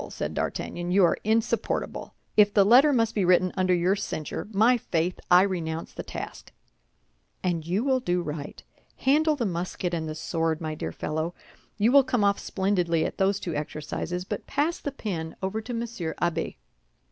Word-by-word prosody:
said - - -4
D'Artagnan, 175 0 -3
"you 190 0 +5
are - - +1
insupportable. 225 +1 -1 0.2
If 205 -1 +6
the 200 -2 +6
letter 255 +8 +7
must 230 -4 +2
be 205 - +1
written 180 0 +3
under 185 -1 +2
your 180 +3 +2
censure, 155 -5 -4
my 220 +5 +5
faith, 175 -6 -1
I 180 +1 +7
renounce 165 -4 -3
the - - -5
task." - - -8 0.9
"And 170 -3 -1
you 190 +6 0
will 265 -1 +2
do 180 -7 0
right. 150 -2 -6 0.3
Handle 305 +3 +3
the 245 -5 -1
musket 180 -1 -3
and 160 -2 -2
the 155 - -5
sword, 160 0 -1
my 155 -1 -3
dear 155 - -4
fellow. 160 +3 -3 0.4
You 220 +3 +3
will 280 0 +7
come 245 -4 0
off 200 0 +3
splendidly 180 -4 0
at - - -5
those 195 +1 +2
two 170 - -4
exercises; 155 +4 -4
but - - -5
pass 300 +5 0
the 285 - -4
pen 170 -11 -4
over 200 +4 -1
to 245 - -7
Monsieur 230 -8 -4
Abbé. 170 -1 -1
185 Hz, 180 wpm, -26 LUFS, 165-225 Hz, 0.9 s, letter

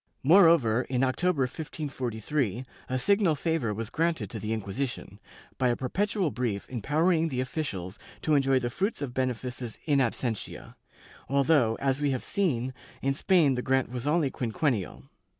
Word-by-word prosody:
Moreover, 160 - +6
in 130 0 +1
October, 140 +3 +1
1543, 130 - -3 0.2
a 130 - 0
signal 195 +2 +3
favor 160 -7 -1
was 110 +2 -4
granted 160 - -1
to - - -5
the 110 - -4
Inquisition, 110 -1 -4 0.4
by 130 - +3
a 120 - +2
perpetual 185 - -1
brief 115 -6 -2
empowering 160 - +1
the 130 -5 -3
officials 110 - -4 0.2
to 155 - +2
enjoy 135 -2 +4
the 120 -2 -1
fruits 195 - -2
of 125 -3 -5
benefices 125 -2 -3
in 145 -3 +3
absentia, 120 -3 -3 0.6
although, 140 -4 +3
as 135 +2 -1
we 145 - +2
have 130 -2 -2
seen, 130 -10 0 0.3
in 135 0 +2
Spain 165 -2 +3
the 125 - -2
grant 130 0 +1
was 125 +2 -4
only 150 -3 +2
quinquennial. 120 - -2
130 Hz, 150 wpm, -28 LUFS, 120-155 Hz, 0.6 s, Moreover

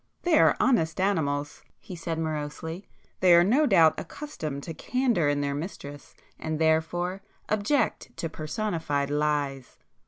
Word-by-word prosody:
"They 340 -3 +4
are - - +5
honest 175 -12 +2
animals!" 145 -7 -1 0.2
he 185 - -9
said 165 -1 -4
morosely—"They 160 +3 -1
are 170 - +7
no 265 +11 +3
doubt 165 - +5
accustomed 160 - -6
to 165 - -6
candour 235 - +1
in 145 0 0
their 140 0 -1
mistress, 145 -2 -7 0.2
and 160 -1 -3
therefore 165 +4 0 0.3
object 215 +4 0
to 165 - -2
personified 155 -4 -2
lies." 145 -3 -1
160 Hz, 130 wpm, -27 LUFS, 145-195 Hz, 0.3 s, are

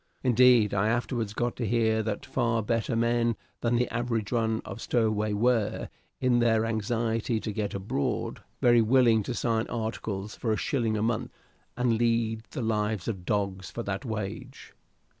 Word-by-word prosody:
Indeed, 125 -3 +5
I 100 +1 +2
afterwards 115 -2 -1
got 120 0 -1
to 120 - -2
hear 110 0 +2
that 105 -2 -3
far 115 -1 0
better 115 +2 0
men 115 0 +2 0.2
than 120 0 +1
the 125 0 +2
average 115 -3 -1
run 110 -2 +1
of 100 +4 -7
stowaway 110 -3 +1
were, 115 0 +1 0.3
in 125 -2 +3
their 115 -2 +3
anxiety 115 +1 -1
to 110 - -4
get 100 -1 -2
abroad, 95 -7 -2 0.2
very 120 -1 +6
willing 115 -1 +4
to 120 +4 -4
sign 115 -2 0
articles 110 -3 -4
for 115 - -2
a 110 - +1
shilling 115 -2 0
a 105 - 0
month, 120 +2 -1 0.5
and 120 -2 +1
lead 115 -1 +1
the 130 - -4
lives 105 -3 -1
of 95 -6 -4
dogs 100 -2 -1
for 120 - -5
that 100 +3 -3
wage. 110 +3 -6
115 Hz, 165 wpm, -28 LUFS, 110-120 Hz, 0.5 s, very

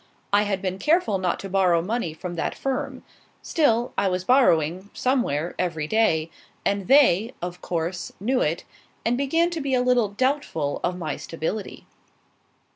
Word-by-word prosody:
I 205 - +6
had 195 -1 -2
been 185 0 -2
careful 300 - +2
not 180 -2 -1
to 195 - -6
borrow 185 -3 +3
money 195 0 -2
from 175 +2 -6
that 170 - -2
firm; 270 0 -3 0.4
still, 240 -7 +1
I 200 - +2
was 180 -1 -1
borrowing, 185 - +3
somewhere, 180 - 0
every 165 -4 -1
day, 165 -5 +1 0.3
and 200 -2 0
they, 245 -5 +4
of 175 0 -6
course, 175 +1 -3
knew 250 +6 +1
it, 160 +3 0 0.4
and 235 +2 +2
began 325 +6 +1
to 330 -2 -3
be 275 -2 0
a 250 - +2
little 250 -4 +3
doubtful 210 - -1
of 180 0 -1
my 155 -5 -3
stability. 165 +6 -5
195 Hz, 160 wpm, -24 LUFS, 175-255 Hz, 0.4 s, I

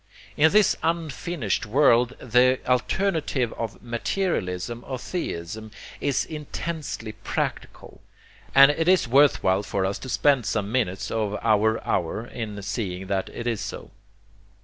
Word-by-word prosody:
In 155 +2 +5
this 210 -1 +4
unfinished 165 - -2
world 125 0 +4
the 125 +2 +3
alternative 140 - 0
of 115 -2 -6
'materialism 120 - -2
or 130 - -3
theism?' 110 - -5 0.3
is 140 -2 0
intensely 150 -6 -5
practical; 110 - -5 0.5
and 140 +1 +9
it 160 +2 -1
is 185 -7 +4
worth 140 +3 +4
while 95 +1 +3
for 100 -2 -2
us 95 +1 -2
to 130 - -8
spend 135 -2 +2
some 105 -1 -1
minutes 105 -7 -1
of 105 -2 -1
our 110 0 +3
hour 90 +6 -1
in 110 -4 -6
seeing 95 -3 -3
that 95 -1 -1
it 120 - -7
is 115 -3 -1
so. - - -7
120 Hz, 135 wpm, -25 LUFS, 105-145 Hz, 0.5 s, and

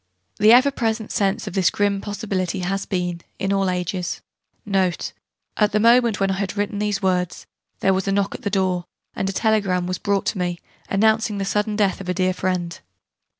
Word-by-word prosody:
The 215 +1 +6
ever 255 +4 +6
present 225 -4 -2
sense 195 -2 0
of - - -6
this 190 -2 +3
grim 200 -1 0
possibility 200 -3 -3
has 195 +2 -2
been, 180 -3 -2 0.2
in 195 +1 -1
all 195 -1 +1
ages,* 180 0 -2 0.5
Note... 190 -4 0 0.4
At 210 -1 +2
the 210 - +3
moment, 235 -1 +4
when 195 0 +2
I 190 - -2
had 200 0 -3
written 205 0 -1
these 210 -1 -1
words, 180 -2 0 0.4
there 195 - +3
was 190 0 -1
a - - +2
knock 200 0 +1
at - - -7
the - - -1
door, 185 -3 0 0.3
and 195 - -1
a - - 0
telegram 195 -4 +1
was 185 0 -3
brought 200 0 0
me, 175 -2 -2 0.3
announcing 220 +1 +2
the 195 - -2
sudden 210 +2 0
death 200 -2 +1
of 185 - -7
a 180 - 0
dear 185 0 +1
friend. 180 -2 -2
195 Hz, 195 wpm, -22 LUFS, 185-210 Hz, 0.5 s, The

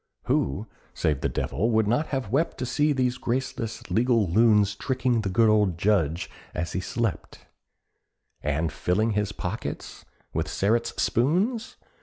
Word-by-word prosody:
Who, 95 +11 0 0.3
save 75 -3 0
the - - 0
devil, 110 +10 -1
would 110 -2 +2
not 120 +8 +1
have 130 -7 -3
wept 150 +6 +1
To 130 - -3
see 150 +5 +1
these 130 -3 0
graceless 120 -2 -3
legal 115 -3 +3
loons 105 +1 +4
Tricking 125 +1 0
the 100 - -2
good 110 +5 +4
old 105 -5 +3
Judge 85 -4 +1 0.3
as 85 - -2
he - - -1
slept, 110 +3 -3 1.0
And 75 +2 -1
filling 105 +8 0
his 105 -1 0
pockets 100 +2 -5 0.3
with - - -1
Sterret's 115 +4 0
spoons? 200 - +1
110 Hz, 145 wpm, -26 LUFS, 95-125 Hz, 1.0 s, loons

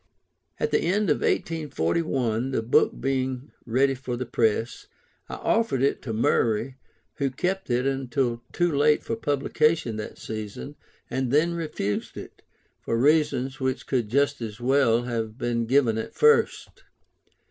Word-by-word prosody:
At 460 - 0
the - - +3
end 190 +1 +1
of - - +3
1841, 130 - -1
the 130 -4 -1
book 115 - +2
being 130 0 -2 0.2
ready 135 +4 +2
for 125 -2 -5
the 130 - -3
press, 115 -1 0 0.4
I - - -5
offered 225 - +1
it 140 - +1
to 115 - -5
Murray, 115 +2 +1 0.4
who 140 -1 0
kept 180 +8 -2
it 125 +1 +1
until 130 -3 -1
too 175 -1 +1
late 150 +1 +3
for 115 - -2
publication 145 -1 0
that 105 - -6
season, 105 -11 -7 0.4
and 130 -1 -1
then 160 +4 +3
refused 150 -11 -3
it, - - -10 0.4
for 115 - -1
reasons 140 -1 +2
which 130 -1 -2
could 120 -5 -1
just 140 +2 +1
as 110 -2 -6
well 120 -2 +3
have 115 -2 -3
been 120 -3 -1
given 120 -4 +3
at 110 - -6
first. 455 0 +2
130 Hz, 145 wpm, -25 LUFS, 115-145 Hz, 0.4 s, the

